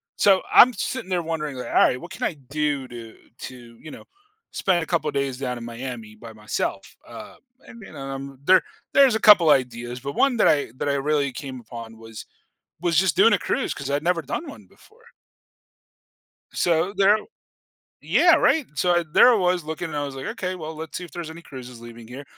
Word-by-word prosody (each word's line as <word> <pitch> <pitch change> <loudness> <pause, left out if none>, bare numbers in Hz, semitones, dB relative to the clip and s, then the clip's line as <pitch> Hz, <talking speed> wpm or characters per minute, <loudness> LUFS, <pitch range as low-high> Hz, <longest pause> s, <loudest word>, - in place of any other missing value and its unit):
So, 195 -2 +4
I'm 250 0 +8
sitting 255 -5 -4
there 180 -2 0
wondering, 150 -4 -4
"Alright, 125 0 +2
what 175 +5 -11
can 190 - -10
I - - -1
do 145 -3 -1
do 115 -2 -10 0.2
to, 120 -2 -11
you 155 - -10
know, - - -11 0.5
spend 175 -3 0
a - - -5
couple 170 -3 -1
of - - -7
days 135 -2 -1
down 125 -2 -3
in 115 - -8
Miami 120 -2 -7
by 110 +1 -12
myself?" 105 0 -4
Uh, - - -11 0.3
and 235 - -13
then, 195 - -12
um, 135 0 -7
there 185 +1 +6 0.3
there's 270 -5 +5
a - - 0
couple 195 -7 +7
ideas, 125 -3 0
but 140 +1 -5
one 270 -3 +2
that - - +4
I 145 -6 +2
that - - -3
I 140 - +1
really 140 0 0
came 130 +1 -8
upon 115 -1 -10
was 115 -1 -11 0.6
was 170 -2 +1
just 185 -4 +3
doing - - +6
a - - +1
cruise - - -2
'cause - - -6
I'd 145 +1 0
never 170 +1 +1
done 315 - -5
one 280 - -12
before. 460 +1 -23 1.5
So, 170 +2 +1
there 200 +2 +5 0.9
Yeah, - - +4
right? 315 -4 +2
So, 180 +3 +1
I 175 - +2
There 250 - +7
I - - +4
was, 180 -3 +1
looking, 160 +2 -5
and 150 - -5
I 145 - -2
was 140 -1 -7
like, 135 - -7
"Okay, 190 -5 -4
well, 160 -2 -7
let's 160 0 -7
see 180 - -7
if 175 - -11
there's 170 -2 -7
any 160 +1 -10
cruises 125 -6 -11
leaving 115 -1 -12
here." 130 +4 -9
150 Hz, 210 wpm, -23 LUFS, 125-180 Hz, 1.5 s, I'm